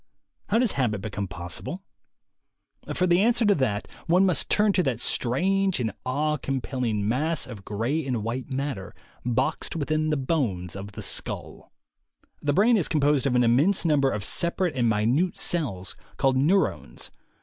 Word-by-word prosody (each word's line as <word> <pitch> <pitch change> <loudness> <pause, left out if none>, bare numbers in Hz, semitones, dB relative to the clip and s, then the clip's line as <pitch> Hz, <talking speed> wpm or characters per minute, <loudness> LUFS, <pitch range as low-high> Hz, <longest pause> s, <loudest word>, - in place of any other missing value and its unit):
How 215 - +3
does 235 -3 +3
habit 120 -6 0
become 100 0 -4
possible? 90 - -6 1.1
For 185 - +1
the 175 +1 +4
answer 235 +1 +3
to 205 - +5
that, 120 - -1 0.2
one 180 +3 +4
must 180 -3 0
turn 210 -1 +3
to 185 - +3
that 135 -8 -1
strange 190 +12 +1
and 110 -3 -1 0.2
awe 150 +4 0
compelling 125 -6 -2
mass 150 +7 0
of 110 -6 -9
gray 115 +11 -1
and 120 -5 -1
white 120 +4 -4
matter 135 -7 -4 0.3
boxed 120 +6 -1
within 155 0 0
the 150 - +1
bones 125 - -1
of 100 +1 -7
the - - -7
skull. - - -2 0.7
The 145 - +1
brain 220 +9 +4
is 180 - +1
composed 145 -2 +2
of 125 - +1
an 125 - +4
immense 145 +13 +3
number 145 -4 +3
of 105 -5 -3
separate 170 +3 0
and 120 -3 +2
minute 120 - +1
cells, 115 - -2 0.2
called 135 -1 +2
"neurones." 165 +9 0
135 Hz, 160 wpm, -26 LUFS, 115-170 Hz, 1.1 s, to